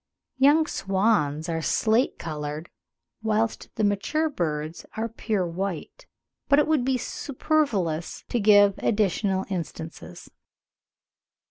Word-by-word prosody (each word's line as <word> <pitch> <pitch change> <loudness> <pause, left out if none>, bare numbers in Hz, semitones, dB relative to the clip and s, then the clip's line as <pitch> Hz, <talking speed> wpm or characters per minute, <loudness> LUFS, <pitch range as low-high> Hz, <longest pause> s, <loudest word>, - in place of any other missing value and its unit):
Young 295 +4 +5
swans 190 - 0
are 165 -1 -2
slate 225 - +2
coloured, 150 0 -5 0.5
whilst 220 0 -1
the 220 - -1
mature 210 +11 +1
birds 155 - -3
are 225 +1 -1
pure 220 -4 -2
white; 185 - -5 0.4
but 280 - +6
it 300 - +5
would 310 -5 +2
be 260 0 +1
superfluous 240 - -1
to 240 - 0
give 205 -1 +6
additional 195 -2 +1
instances. 160 - -6
205 Hz, 110 wpm, -25 LUFS, 165-240 Hz, 0.5 s, but